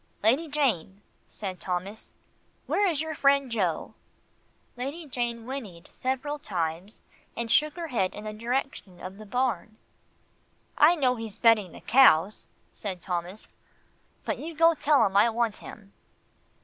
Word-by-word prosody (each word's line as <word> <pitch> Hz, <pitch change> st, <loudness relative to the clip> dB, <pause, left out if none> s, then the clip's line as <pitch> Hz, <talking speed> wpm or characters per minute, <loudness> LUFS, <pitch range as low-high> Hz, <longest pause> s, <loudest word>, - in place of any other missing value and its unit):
"Lady 265 Hz, +10 st, +3 dB
Jane," 225 Hz, -, -1 dB, 0.2 s
said 190 Hz, -3 st, -6 dB
Thomas, 190 Hz, +4 st, -4 dB, 0.5 s
"where 410 Hz, -, +2 dB
is 315 Hz, -5 st, 0 dB
your 315 Hz, 0 st, -4 dB
friend 280 Hz, -3 st, +3 dB
Joe?" 185 Hz, -8 st, -1 dB, 0.8 s
Lady 280 Hz, +7 st, -5 dB
Jane 240 Hz, -4 st, -3 dB
whinnied 225 Hz, -10 st, -7 dB
several 265 Hz, +3 st, -3 dB
times, 175 Hz, -, -4 dB, 0.3 s
and 235 Hz, -1 st, -3 dB
shook 300 Hz, +4 st, +3 dB
her 340 Hz, -2 st, -5 dB
head 190 Hz, -8 st, 0 dB
in 210 Hz, -, -8 dB
the 215 Hz, 0 st, -5 dB
direction 230 Hz, -4 st, -3 dB
of 185 Hz, +2 st, -8 dB
the 215 Hz, -, -10 dB
barn. 245 Hz, -2 st, -1 dB, 1.0 s
"I 320 Hz, +4 st, +6 dB
know 255 Hz, -6 st, +1 dB
he's 225 Hz, -2 st, -7 dB
bedding 220 Hz, -6 st, +4 dB
the -, -, -12 dB
cows," 215 Hz, -7 st, +4 dB, 0.3 s
said 190 Hz, -4 st, -5 dB
Thomas, 180 Hz, +3 st, -5 dB, 0.8 s
"but -, -, -2 dB
you 330 Hz, +1 st, -6 dB
go 330 Hz, +2 st, +5 dB
tell 300 Hz, -2 st, +3 dB
him 195 Hz, -, -2 dB
I 210 Hz, +4 st, +6 dB
want 230 Hz, -1 st, 0 dB
him." 200 Hz, -1 st, -12 dB
230 Hz, 145 wpm, -27 LUFS, 195-275 Hz, 1.0 s, I